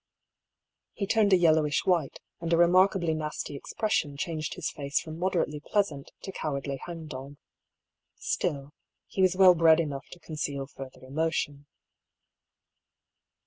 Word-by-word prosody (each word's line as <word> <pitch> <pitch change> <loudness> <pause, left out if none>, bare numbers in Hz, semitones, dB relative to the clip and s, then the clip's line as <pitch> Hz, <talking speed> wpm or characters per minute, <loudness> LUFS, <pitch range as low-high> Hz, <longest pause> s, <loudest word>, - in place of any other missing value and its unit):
He 200 - -2
turned 210 0 +3
a 190 - +7
yellowish 155 -4 +3
white, 170 -7 +1 0.2
and 170 0 -4
a 165 - +4
remarkably 175 0 +4
nasty 150 -2 -4
expression 145 -2 -1
changed 155 0 -3
his - - -3
face 140 -1 -1
from 160 0 -8
moderately 175 -5 0
pleasant 155 -10 -1
to 195 - -5
cowardly 140 -5 -3
hang 165 -2 -7
dog. 140 -1 -8 0.8
Still, 140 0 -2 0.3
he 190 - -3
was 185 -1 +4
well 185 -1 +8
bred 165 -1 +5
enough 140 -4 -3
to 175 - -13
conceal 150 -4 -4
further 135 -1 -11
emotion. 145 0 -2
160 Hz, 135 wpm, -28 LUFS, 145-175 Hz, 0.8 s, well